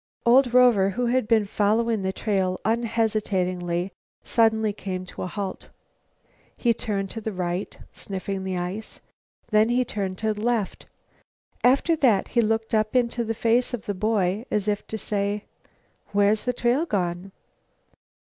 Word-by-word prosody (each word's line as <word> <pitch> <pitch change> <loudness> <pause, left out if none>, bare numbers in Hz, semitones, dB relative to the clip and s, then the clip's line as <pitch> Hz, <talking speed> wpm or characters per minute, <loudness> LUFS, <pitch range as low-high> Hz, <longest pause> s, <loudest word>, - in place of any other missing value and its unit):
Old 245 +1 +5
Rover, 240 -6 +5
who 245 +5 -1
had 245 -1 +1
been 220 -2 +3
following 215 +2 +1
the 190 0 -1
trail 190 -3 -1
unhesitatingly, 200 -6 0 0.3
suddenly 220 -2 +2
came 185 -2 -5
to - - -9
a - - -2
halt. 195 +1 -5 0.9
He 235 -2 +2
turned 200 -3 -3
to 225 - -6
the 220 - -3
right, 180 0 -3 0.2
sniffing 195 0 -5
the 190 -1 -2
ice. 180 +5 -5 0.5
Then 215 +1 +4
he 250 +1 +2
turned 195 -5 -3
to 220 +1 0
the 210 - -8
left. 230 -3 -1 0.8
After 275 +7 +4
that 235 -10 +3
he 240 - +3
looked 225 0 -1
up 215 +1 +1
into 240 -1 +1
the 225 0 -3
face 235 +3 +2
of 225 - -11
the 205 - -2
boy, 200 0 0
as 210 -1 -1
if 205 -1 -1
to 220 - -4
say: 205 0 -2 0.7
"Where's 205 +1 +3
the 250 - +1
trail 245 +7 +1
gone?" 180 - -2
215 Hz, 155 wpm, -25 LUFS, 195-230 Hz, 0.9 s, Old